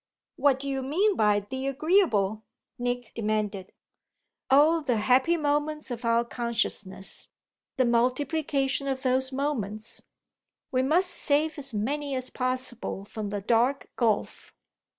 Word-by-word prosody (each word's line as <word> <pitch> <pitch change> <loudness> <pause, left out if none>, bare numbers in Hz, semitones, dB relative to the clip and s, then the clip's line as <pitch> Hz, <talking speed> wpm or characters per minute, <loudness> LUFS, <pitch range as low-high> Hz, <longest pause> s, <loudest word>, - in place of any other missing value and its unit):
"What 280 -2 +3
do 280 - -4
you 270 -1 -1
mean 370 +10 +1
by 210 -1 +3
the 260 +6 -5
agreeable?" 275 - +2 0.4
Nick 245 -1 -3
demanded. 210 -3 -2 0.8
"Oh 305 +5 +5
the 255 -6 0
happy 260 +9 +3
moments 295 -1 -1
of 240 0 -5
our 230 +1 +3
consciousness 220 -5 -3 0.5
the 260 - +3
multiplication 270 +3 +1
of 265 -1 -2
those 260 0 +1
moments. 230 -6 -3 0.7
We 255 -2 +2
must 340 +8 +2
save 300 +2 +1
as 275 -5 -4
many 280 +6 -1
as 255 0 -4
possible 255 -5 -3
from 210 0 -5
the 205 0 -3
dark 240 +5 +1
gulf." 225 -4 -1
255 Hz, 130 wpm, -27 LUFS, 225-285 Hz, 0.8 s, Oh